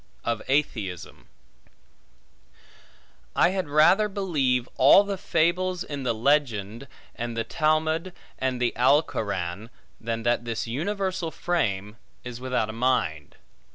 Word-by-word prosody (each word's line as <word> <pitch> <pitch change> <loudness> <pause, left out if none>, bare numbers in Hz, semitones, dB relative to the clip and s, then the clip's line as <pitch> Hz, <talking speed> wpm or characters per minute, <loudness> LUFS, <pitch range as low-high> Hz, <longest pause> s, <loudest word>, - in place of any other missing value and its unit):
Of 115 -2 -1
Atheism 110 - -2 2.1
I 175 - +4
HAD 185 -4 -3
rather 175 +8 +4
believe 145 - 0
all 140 +9 +7
the 200 -1 -3
fables 180 +1 0
in 145 -2 -6
the 120 -3 -1
Legend, 120 -3 0 0.3
and 120 -1 -5
the 115 - 0
Talmud, 155 +6 0 0.3
and 130 -1 -1
the 125 -1 0
Alcoran, 110 - 0 0.3
than 115 0 -3
that 120 0 +1
this 115 -2 -3
universal 185 - -2
frame 105 - -2 0.3
is 125 0 -8
without 125 -4 -1
a 110 - -6
mind. 110 - -1
130 Hz, 120 wpm, -25 LUFS, 115-165 Hz, 2.1 s, all